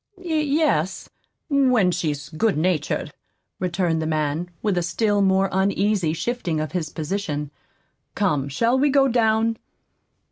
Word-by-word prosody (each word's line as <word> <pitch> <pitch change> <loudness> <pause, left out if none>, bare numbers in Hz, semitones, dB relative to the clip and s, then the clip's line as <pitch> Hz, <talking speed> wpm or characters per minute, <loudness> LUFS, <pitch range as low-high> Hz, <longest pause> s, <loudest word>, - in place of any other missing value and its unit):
"Y 355 -3 -5
yes, 290 - 0 0.4
when 255 - +3
she's 150 -5 -3
good 170 +4 0
natured," 165 -1 -1 0.5
returned 175 -2 0
the 160 - -2
man, 155 +2 -1
with 205 -4 +1
a 175 - +1
still 205 +4 +1
more 190 0 +3
uneasy 195 -2 +1
shifting 175 -2 -2
of 155 0 -3
his 170 -4 -2
position. 155 -3 -3 0.6
"Come, 150 -9 0
shall 230 - +1
we 290 +2 +3
go 275 0 +4
down?" 225 -2 +2
190 Hz, 135 wpm, -23 LUFS, 160-230 Hz, 0.6 s, go